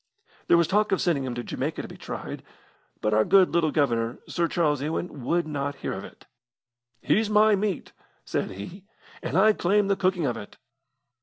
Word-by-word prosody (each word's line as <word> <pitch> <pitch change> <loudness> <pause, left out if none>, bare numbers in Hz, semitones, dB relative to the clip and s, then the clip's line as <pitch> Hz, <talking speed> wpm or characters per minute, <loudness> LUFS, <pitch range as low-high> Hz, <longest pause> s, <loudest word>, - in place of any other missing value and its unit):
There 170 - +6
was 170 - +4
talk 210 +1 +2
of 195 - +2
sending 160 -8 +1
him 125 -2 -4
to 120 - -4
Jamaica - - -3
to - - -7
be - - -11
tried, - - -7 0.6
but 105 - +1
our 110 +1 +4
good 190 - +5
little 170 -2 +2
Governor, 120 -6 0
Sir 170 -1 0
Charles 150 -5 +1
Ewan, 150 -2 -4
would 170 +5 +1
not 145 -2 -3
hear - - -4
of - - -6
it. - - -13 0.8
'He's 215 0 +2
my 215 0 +5
meat,' 200 -3 -2 0.3
said - - -2
he, 135 - -9 0.4
'and - - -2
I 215 0 +6
claim 200 +2 +2
the 200 - +3
cooking 185 -3 +1
of 120 -4 -1
it.' 105 -2 -10
170 Hz, 190 wpm, -26 LUFS, 140-195 Hz, 0.8 s, There